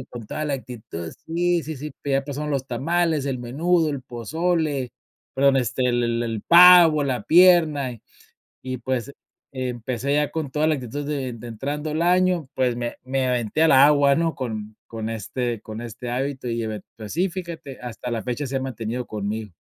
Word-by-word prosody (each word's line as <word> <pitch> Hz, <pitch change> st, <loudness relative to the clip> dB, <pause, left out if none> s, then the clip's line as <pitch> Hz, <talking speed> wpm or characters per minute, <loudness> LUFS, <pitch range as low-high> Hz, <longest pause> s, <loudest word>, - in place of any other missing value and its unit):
y 130 Hz, -, -8 dB
con 120 Hz, -3 st, -9 dB
toda 155 Hz, -, -3 dB
la 145 Hz, -2 st, -1 dB
actitud, 110 Hz, -11 st, -7 dB
sí, 175 Hz, +1 st, +1 dB
sí, 155 Hz, -1 st, -5 dB
sí, 150 Hz, +3 st, -7 dB
pero 135 Hz, -1 st, +1 dB
ya -, -, -14 dB
pasaron 150 Hz, +1 st, -4 dB
los 135 Hz, -1 st, -1 dB
tamales, 155 Hz, +3 st, 0 dB
el 130 Hz, -3 st, -2 dB
menudo, 160 Hz, +6 st, +1 dB
el 140 Hz, -, -4 dB
pozole, 145 Hz, +2 st, -1 dB, 0.4 s
perdón, 135 Hz, 0 st, +4 dB
este, 130 Hz, 0 st, 0 dB
el 120 Hz, 0 st, +1 dB
el 115 Hz, 0 st, 0 dB
el 115 Hz, -3 st, -3 dB
pavo, 170 Hz, -3 st, +8 dB
la 125 Hz, -6 st, -2 dB
pierna, 160 Hz, -6 st, +5 dB
y 115 Hz, -, -12 dB, 0.6 s
y 130 Hz, -1 st, -4 dB
pues 130 Hz, +2 st, -3 dB, 0.4 s
empecé 130 Hz, +1 st, -2 dB
ya 150 Hz, -1 st, +1 dB
con 155 Hz, -4 st, -3 dB
toda 150 Hz, +3 st, +1 dB
la 155 Hz, -, +3 dB
actitud 140 Hz, +2 st, -5 dB
de 135 Hz, -4 st, -3 dB
de 120 Hz, +1 st, -10 dB
entrando 145 Hz, +7 st, -4 dB
el 160 Hz, +2 st, 0 dB
año, 180 Hz, -4 st, +2 dB
pues, 125 Hz, -2 st, +1 dB
me 120 Hz, -1 st, -4 dB
me 130 Hz, 0 st, 0 dB
aventé 125 Hz, +4 st, 0 dB
al 160 Hz, -, +5 dB
agua, 140 Hz, +1 st, +6 dB
¿no? 165 Hz, -1 st, 0 dB
Con 110 Hz, -4 st, -5 dB
con 110 Hz, 0 st, -5 dB
este 115 Hz, +1 st, -3 dB
con 110 Hz, 0 st, -7 dB
este 120 Hz, +1 st, -7 dB
hábito 130 Hz, 0 st, -3 dB
y 115 Hz, 0 st, -2 dB
eve 110 Hz, -1 st, -4 dB, 0.2 s
pues 110 Hz, -2 st, -8 dB
sí, 180 Hz, +6 st, +1 dB
fíjate, 170 Hz, -7 st, -7 dB
hasta 125 Hz, 0 st, -7 dB
la 115 Hz, -, -2 dB
fecha 125 Hz, +3 st, -3 dB
se 135 Hz, -, -6 dB
ha -, -, 0 dB
mantenido 125 Hz, -1 st, -4 dB
conmigo. 105 Hz, -1 st, -4 dB
135 Hz, 195 wpm, -23 LUFS, 120-155 Hz, 0.6 s, pavo